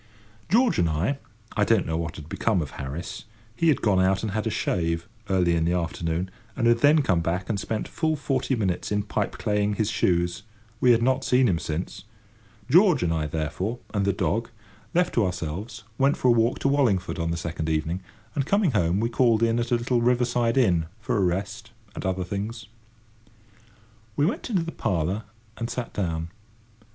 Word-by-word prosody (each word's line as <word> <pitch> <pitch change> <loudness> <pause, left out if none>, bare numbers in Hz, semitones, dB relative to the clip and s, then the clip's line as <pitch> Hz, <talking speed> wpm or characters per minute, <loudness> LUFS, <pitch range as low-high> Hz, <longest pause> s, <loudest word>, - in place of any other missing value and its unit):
George 235 +5 +3
and 85 - +3
I—I 110 - -2
don't 110 -2 +3
know 80 - -2
what 80 0 -3
had 75 -1 -9
become 105 +3 0
of 70 - -8
Harris; 70 +10 -6 0.3
he 165 - +1
had 150 -6 +3
gone 95 -4 +3
out 95 +2 +2
and 110 - -2
had 110 +2 -1
a - - +1
shave, 85 -3 -1 0.2
early 90 -3 +3
in 85 -1 +1
the 85 +2 +1
afternoon, 85 +1 -2 0.2
and 120 - 0
had 120 0 +4
then 145 +3 +5
come 95 -9 +2
back 90 +2 -2
and 105 -3 0
spent 110 +3 -3
full 160 -1 0
forty 135 -2 -1
minutes 95 -6 -1
in 105 0 +1
pipeclaying 105 0 -1
his 110 0 0
shoes, 85 0 +1 0.4
we 125 - +4
had 115 -1 +5
not 130 +2 +2
seen 125 0 +3
him 85 -4 +1
since—George 80 +2 0
and 85 -1 +1
I, 80 -2 -1
therefore, 80 +9 -3 0.2
and 100 -2 +1
the 100 - +3
dog, 110 +4 -1 0.5
left 180 +1 +2
to 115 - +3
ourselves, 95 +5 -4 0.2
went 135 +1 +3
for 125 - +2
a - - +7
walk 115 +1 +2
to - - +2
Wallingford 115 -11 +1
on 85 0 -1
the 85 - -1
second 80 -1 -3
evening, 80 +4 -1 0.3
and, 140 - 0
coming 200 -5 +3
home, 90 -4 +1
we 115 - +2
called 115 -1 +3
in 115 0 +2
at 120 0 -2
a 120 - +3
little 120 +1 0
river 125 +1 +3
side 120 0 0
inn, 85 -10 +3
for 115 +3 -2
a - - +2
rest, 95 +4 -2 0.2
and - - -6
other 95 0 -1
things. 105 +5 -4 1.5
We 145 - +2
went 205 +7 -2
into 190 -7 +1
the 165 - -5
parlour 95 - -1 0.3
and 115 0 -3
sat 120 0 -4
down. 85 -4 -2
105 Hz, 195 wpm, -25 LUFS, 85-120 Hz, 1.5 s, a